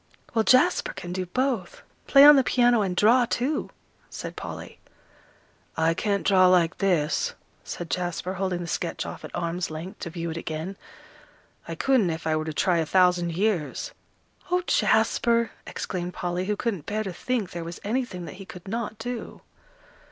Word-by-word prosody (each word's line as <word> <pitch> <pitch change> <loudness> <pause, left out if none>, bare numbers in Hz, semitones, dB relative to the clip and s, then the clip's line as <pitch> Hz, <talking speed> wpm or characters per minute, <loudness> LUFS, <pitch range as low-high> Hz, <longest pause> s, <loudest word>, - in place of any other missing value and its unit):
"Well, 225 - +3
Jasper 255 +10 +3
can 175 0 -7
do 185 0 -3
both, 245 -3 -2 0.2
play 275 0 +8
on 295 0 +10
the 270 - +5
piano, 245 -2 +3
and 190 -3 -1
draw, 235 +6 +5
too," 275 +6 -1 0.4
said - - -7
Polly. - - -8 1.0
"I 160 +1 +3
can't 200 +3 -1
draw 185 -2 +6
like 180 -2 +3
this," 190 - +1 0.3
said 175 - -6
Jasper, 180 +1 -2
holding 185 -2 -2
the 170 - -5
sketch - - -3
off - - -8
at - - -8
arm's 170 +1 -2
length 160 +4 -7
to 170 - -5
view 170 0 -4
it 160 - -5
again. 160 +4 -4 0.9
"I - - -4
couldn't 255 -9 +2
if 160 -1 -4
I 160 -1 +1
were 155 0 -1
to 160 - -3
try 170 +3 +1
a 160 - +1
thousand 180 -1 +3
years." 185 -4 -1 0.6
"Oh, 360 0 +1
Jasper!" 235 -8 +2 0.2
exclaimed 180 -1 -4
Polly, 175 +1 -2
who 210 +1 0
couldn't 200 -8 -3
bear 215 +1 -1
to 190 -3 -5
think 220 0 -2
there 170 -1 -5
was 170 +1 -7
anything 210 -5 -2
that 165 +3 -9
he - - -6
could 180 0 -11
not 220 +1 -3
do. 240 +2 -6
185 Hz, 175 wpm, -26 LUFS, 170-230 Hz, 1.0 s, on